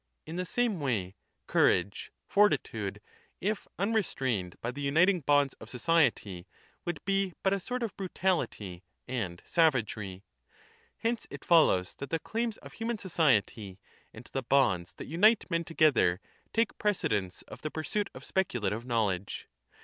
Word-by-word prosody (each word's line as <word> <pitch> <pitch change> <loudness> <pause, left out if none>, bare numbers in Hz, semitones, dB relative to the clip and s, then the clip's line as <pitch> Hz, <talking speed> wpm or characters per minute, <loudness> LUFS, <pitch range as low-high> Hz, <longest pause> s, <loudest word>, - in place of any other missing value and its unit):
In 160 - -7
the 180 +1 -2
same 230 0 0
way, 110 -10 -1 0.3
courage 100 - +2 0.2
[Fortitude], 205 +1 +2 0.4
if 210 +2 -2
unrestrained 135 - -1
by 120 - -3
the 140 +3 -7
uniting 170 +7 +4
bonds 145 -2 +3
of 110 - -9
society, 125 - +1 0.4
would 175 -3 -4
be 195 -2 +1
but 190 - +3
a 200 - 0
sort 250 +6 -3
of 220 -4 -3
brutahty 175 - -1 0.3
and 105 -9 -3
savagery. 110 - +1 0.7
Hence 230 0 -1
it - - -9
follows 150 - +4
that 140 - -5
the 165 - +1
claims 225 +5 -2
of - - -13
human 225 0 -2
society 115 - +1 0.3
and - - -12
the 135 - 0
bonds 115 -10 +2
that - - -7
unite 210 +8 +4
men 165 0 +1
together 155 - +3 0.3
take 230 +1 0
precedence 105 - 0
of - - -11
the 155 - -3
pursuit 195 +7 -2
of - - -10
speculative 120 - -1
knowledge. 105 -6 -1
155 Hz, 140 wpm, -30 LUFS, -, 0.7 s, uniting